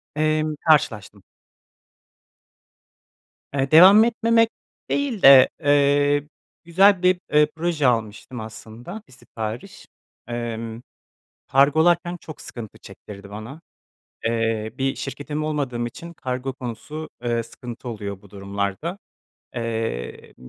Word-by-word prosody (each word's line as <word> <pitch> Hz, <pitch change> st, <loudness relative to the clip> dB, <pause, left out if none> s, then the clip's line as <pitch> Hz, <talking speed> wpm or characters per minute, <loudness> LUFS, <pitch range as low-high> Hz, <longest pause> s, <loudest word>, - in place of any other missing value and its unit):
Emm, 155 Hz, 0 st, 0 dB
karşılaştım. 105 Hz, -10 st, +2 dB, 2.3 s
Eee, 135 Hz, 0 st, -1 dB
devam 190 Hz, +7 st, +9 dB
etmemek 230 Hz, 0 st, +2 dB, 0.4 s
değil 275 Hz, -8 st, -1 dB
de, 135 Hz, -1 st, +9 dB
eee, 145 Hz, 0 st, +3 dB, 0.4 s
güzel 185 Hz, +3 st, +4 dB
bir, 180 Hz, 0 st, +4 dB
eee, 150 Hz, 0 st, +5 dB
proje 160 Hz, -4 st, 0 dB
almıştım 115 Hz, +1 st, -2 dB
aslında 110 Hz, -, -9 dB
1 -, -, -19 dB
sipariş. 110 Hz, -2 st, -8 dB, 0.4 s
Emm, 115 Hz, -1 st, -5 dB, 0.7 s
kargolarken 160 Hz, +6 st, +3 dB
çok 155 Hz, -, -10 dB
sıkıntı 115 Hz, -4 st, -9 dB
çektirdi 100 Hz, -1 st, -12 dB
bana. 110 Hz, +10 st, -9 dB, 0.6 s
Eee, 115 Hz, -1 st, -1 dB
bir 135 Hz, 0 st, 0 dB
şirketim 145 Hz, +2 st, -5 dB
olmadığım 135 Hz, -6 st, -2 dB
için 170 Hz, +8 st, -9 dB
kargo 130 Hz, -2 st, -4 dB
konusu, 130 Hz, +5 st, -7 dB, 0.2 s
eee, 120 Hz, -1 st, 0 dB
sıkıntı 120 Hz, +1 st, -9 dB
oluyor 100 Hz, -3 st, -6 dB
bu 100 Hz, -, -18 dB
durumlarda. 100 Hz, -, -4 dB, 0.6 s
Eee, 115 Hz, -, -4 dB
m 65 Hz, 0 st, -14 dB
135 Hz, 105 wpm, -23 LUFS, 115-155 Hz, 2.3 s, devam